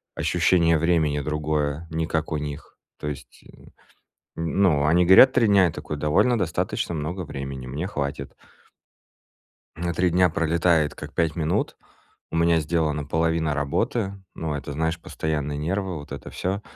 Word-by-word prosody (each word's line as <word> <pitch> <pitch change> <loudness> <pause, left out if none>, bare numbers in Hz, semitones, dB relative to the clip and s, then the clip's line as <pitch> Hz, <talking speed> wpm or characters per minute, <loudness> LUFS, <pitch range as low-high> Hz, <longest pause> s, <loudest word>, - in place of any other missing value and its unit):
ощущение 85 -1 +3
времени 80 -3 +2
другое, 75 +1 -2
не 80 0 -1
как 80 -1 -2
у 75 - 0
них. 75 0 -7 0.2
То - - -5
есть, 75 - -9
м, - - -17 0.6
ну, 80 -2 +2
они 85 +4 +4
говорят 95 +9 +8
три 115 - +3
дня, 100 -2 +5
я 85 - +1
такой: 75 - -6
довольно 75 - +2
достаточно 85 -2 -2
много 80 +5 -3
времени, 70 -3 -6
мне 75 +8 -4
хватит. 70 -6 -4 1.4
А 85 +1 -2
три 90 +2 +2
дня 90 +1 +4
пролетает 85 -1 +1
как - - -9
пять 80 -3 0
минут, 80 -2 -1 0.5
у - - -3
меня 85 0 +3
сделана 75 -2 -1
половина 80 +1 0
работы, 95 - -1 0.2
но 75 -3 -3
это, 70 - -6
знаешь, 80 +3 -1
постоянные 75 -2 -3
нервы, 95 +4 -2
вот 75 - -12
это - - -7
всё. 95 +3 -3
80 Hz, 155 wpm, -24 LUFS, 75-85 Hz, 1.4 s, говорят